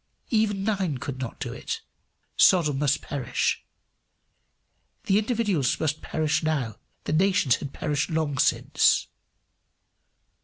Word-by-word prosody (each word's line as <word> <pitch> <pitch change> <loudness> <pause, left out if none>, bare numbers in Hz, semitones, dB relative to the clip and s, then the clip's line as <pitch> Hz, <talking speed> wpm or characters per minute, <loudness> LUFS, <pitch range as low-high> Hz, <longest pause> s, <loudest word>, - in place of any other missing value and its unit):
Even 215 -3 +1
nine 195 -9 0
could 135 0 -6
not 130 -3 -6
do - - -4
it: - - -5 0.5
Sodom 150 -7 +4
must 145 -2 +1
perish. 135 -4 -1 1.4
The 195 +1 +3
individuals 210 - 0
must 155 -1 -1
perish 155 0 0
now; 140 -9 -1 0.3
the - - -2
nation 185 -4 +2
had 140 - -6
perished 145 0 -2
long 155 -4 -1
since. - - +3
155 Hz, 115 wpm, -26 LUFS, 140-195 Hz, 1.4 s, Sodom